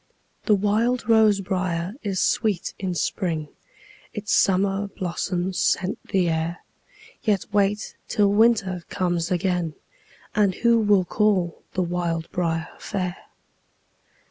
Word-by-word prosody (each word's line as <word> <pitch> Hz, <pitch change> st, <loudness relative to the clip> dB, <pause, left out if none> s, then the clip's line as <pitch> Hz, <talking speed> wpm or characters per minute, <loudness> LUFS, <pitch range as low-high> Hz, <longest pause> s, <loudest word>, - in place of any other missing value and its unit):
The 210 Hz, -, +6 dB
wild 220 Hz, +5 st, +1 dB
rose 220 Hz, -3 st, +5 dB
briar 185 Hz, -1 st, -2 dB
is 195 Hz, -4 st, -2 dB
sweet 210 Hz, -6 st, 0 dB
in 185 Hz, -2 st, -2 dB
spring, 160 Hz, -4 st, -2 dB, 0.7 s
Its 210 Hz, -1 st, -3 dB
summer 195 Hz, +1 st, +2 dB
blossoms 180 Hz, 0 st, -3 dB
scent 185 Hz, +2 st, +1 dB
the 185 Hz, -2 st, +1 dB
air; 165 Hz, +1 st, -2 dB, 0.6 s
Yet 205 Hz, -5 st, +1 dB
wait 205 Hz, +1 st, +1 dB
till 205 Hz, -1 st, +3 dB
winter 205 Hz, -5 st, +3 dB
comes 175 Hz, -3 st, -1 dB
again, 180 Hz, -3 st, 0 dB, 0.6 s
And 200 Hz, -3 st, +2 dB
who 235 Hz, 0 st, +3 dB
will 205 Hz, -4 st, +3 dB
call 190 Hz, -4 st, +1 dB
the 185 Hz, -, +1 dB
wild 170 Hz, -2 st, -2 dB
briar 165 Hz, -2 st, -1 dB
fair? 180 Hz, -2 st, -3 dB
190 Hz, 115 wpm, -24 LUFS, 175-205 Hz, 0.7 s, The